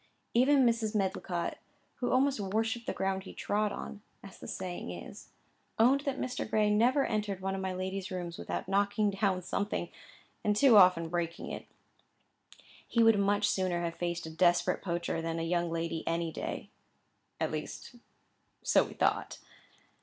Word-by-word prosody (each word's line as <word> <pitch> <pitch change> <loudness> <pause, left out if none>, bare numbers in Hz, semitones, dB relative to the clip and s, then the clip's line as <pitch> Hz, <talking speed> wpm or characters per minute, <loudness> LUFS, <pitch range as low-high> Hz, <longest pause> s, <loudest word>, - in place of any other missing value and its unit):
Even 265 +2 +5
Mrs. 230 -2 +1
Medlicott, 190 -3 -1 0.4
who 245 - -1
almost 270 0 +3
worshipped 225 +4 -1
the - - +1
ground 190 0 -1
he 190 - -11
trod 210 0 0
on, 205 - -7 0.2
as 195 - -12
the - - -9
saying 180 - -5
is, 90 -1 -9 0.5
owned 250 +5 +5
that 275 -1 -1
Mr. 255 -4 -3
Gray 215 -1 +3
never 245 +6 +3
entered 205 -3 -2
one 190 0 -2
of 195 - -3
my 190 0 -2
lady's 190 +1 -4
rooms 175 -3 -5
without - - -4
knocking 200 +1 +2
down 195 -2 0
something, 200 -2 -2 0.5
and 210 0 +2
too 250 +1 +6
often 180 -4 +6
breaking 170 0 -3
it. - - -7 1.2
He 230 - +3
would 225 -2 +5
much 205 +1 +2
sooner 180 -3 0
have 170 -1 -2
faced 170 0 -3
a 160 - -6
desperate 175 +1 +2
poacher 170 -2 -2
than 165 0 -3
a 165 - -2
young 170 0 0
lady 165 -1 -2
any 165 0 0
day. - - -5 0.7
At - - 0
least - - -6 0.7
so - - +4
we - - -9
thought. - - 0
195 Hz, 165 wpm, -31 LUFS, 175-215 Hz, 1.2 s, too